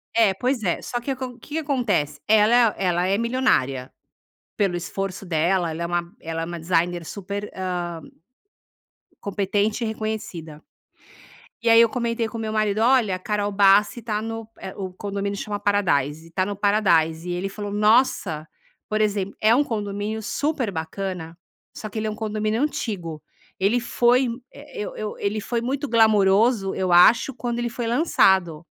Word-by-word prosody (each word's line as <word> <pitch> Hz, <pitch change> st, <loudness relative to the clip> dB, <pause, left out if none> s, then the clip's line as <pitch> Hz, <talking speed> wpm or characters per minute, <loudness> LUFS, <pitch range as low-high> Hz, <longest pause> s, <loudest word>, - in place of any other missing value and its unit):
é, 220 Hz, -4 st, +4 dB
pois 250 Hz, +4 st, -1 dB
é. 175 Hz, -, 0 dB
Só 240 Hz, -, -3 dB
que 270 Hz, +3 st, -4 dB
o -, -, +1 dB
acon 255 Hz, -1 st, -6 dB
o -, -, -20 dB
que 300 Hz, +6 st, -6 dB
acontece? 245 Hz, -, -1 dB
Ela 220 Hz, +2 st, +5 dB
ela 180 Hz, -2 st, +1 dB
é 195 Hz, -, +2 dB
milionária. 220 Hz, -, 0 dB, 0.7 s
Pelo 195 Hz, -4 st, +1 dB
esforço 195 Hz, +2 st, -4 dB
dela, 170 Hz, +1 st, +1 dB
ela 165 Hz, +2 st, -5 dB
é -, -, -1 dB
uma 175 Hz, 0 st, -2 dB
ela 165 Hz, 0 st, -4 dB
é -, -, -1 dB
uma 170 Hz, 0 st, -5 dB
designer 175 Hz, 0 st, 0 dB
super, 200 Hz, +3 st, -5 dB
hã 180 Hz, -2 st, -2 dB, 1.4 s
competente 205 Hz, +3 st, -1 dB
e -, -, -1 dB
reconhecida. 205 Hz, -8 st, -5 dB, 1.0 s
E 235 Hz, -, +1 dB
aí 230 Hz, 0 st, +8 dB
eu 230 Hz, -, +5 dB
comentei 230 Hz, -1 st, -1 dB
com 230 Hz, -, -7 dB
o -, -, -4 dB
meu 215 Hz, 0 st, -3 dB
marido: 215 Hz, -1 st, +1 dB
"Olha, 230 Hz, -5 st, +3 dB
a -, -, -7 dB
Carol 205 Hz, +1 st, -1 dB
Bassi 200 Hz, +3 st, +4 dB
tá 215 Hz, -1 st, -2 dB
no" 225 Hz, 0 st, -5 dB
eh, 190 Hz, -, -7 dB
o 190 Hz, -2 st, -5 dB
condomínio 200 Hz, +1 st, -4 dB
chama 205 Hz, 0 st, -4 dB
Paradise 165 Hz, -6 st, 0 dB
"tá 185 Hz, +1 st, 0 dB
no 205 Hz, 0 st, -4 dB
Paradise.". 180 Hz, -5 st, +2 dB
E -, -, -1 dB
ele 190 Hz, +3 st, -3 dB
falou: 205 Hz, 0 st, -6 dB
"Nossa!" 210 Hz, -7 st, +2 dB, 0.4 s
Por 215 Hz, 0 st, 0 dB
exemp 200 Hz, -2 st, 0 dB
é 220 Hz, +2 st, +5 dB
um 290 Hz, -, +4 dB
condomínio 210 Hz, -1 st, -3 dB
super 280 Hz, -2 st, -1 dB
bacana, 165 Hz, 0 st, -5 dB, 0.4 s
só 215 Hz, -, -6 dB
que 220 Hz, -, -8 dB
ele 215 Hz, -, -2 dB
é -, -, -1 dB
um -, -, -6 dB
condomínio 215 Hz, +2 st, -1 dB
antigo. 180 Hz, -, -3 dB, 0.4 s
Ele 210 Hz, +6 st, +2 dB
foi 245 Hz, +2 st, +2 dB, 0.2 s
eh, 290 Hz, +1 st, -11 dB
eu -, -, -5 dB
eu 215 Hz, -1 st, -4 dB
ele 205 Hz, +1 st, -1 dB
foi 230 Hz, +1 st, -2 dB
muito 275 Hz, +4 st, -2 dB
glamoroso, 215 Hz, -1 st, +3 dB
eu 185 Hz, -2 st, -1 dB
acho, 230 Hz, +9 st, +6 dB
quando 240 Hz, 0 st, -3 dB
ele 240 Hz, 0 st, -1 dB
foi 235 Hz, -1 st, -4 dB
lançado. 190 Hz, -, +2 dB
205 Hz, 175 wpm, -23 LUFS, 180-230 Hz, 1.4 s, aí